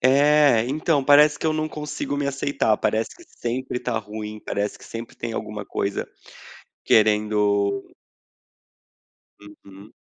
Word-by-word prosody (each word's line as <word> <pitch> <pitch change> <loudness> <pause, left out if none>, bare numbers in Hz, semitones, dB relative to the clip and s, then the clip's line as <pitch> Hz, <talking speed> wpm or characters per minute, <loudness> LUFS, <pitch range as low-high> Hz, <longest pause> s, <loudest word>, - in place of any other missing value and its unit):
É, 140 -2 +5
então, 145 +1 0
parece 150 +1 +6
que - - -2
eu 155 - +2
não 155 0 -1
consigo 150 -2 -4
me 145 0 -1
aceitar, 140 -5 0
parece 110 +2 -1
que 345 - -16
sempre 125 - -4
está 125 -3 -2
ruim, 105 0 -7
parece 105 0 -2
que - - -15
sempre 115 +1 -8
tem 115 -1 -5
alguma 105 -2 -5
coisa 100 - -3 0.8
querendo 105 -2 +2 1.6
Uhum. 100 -1 -15
115 Hz, 130 wpm, -23 LUFS, 105-145 Hz, 1.6 s, parece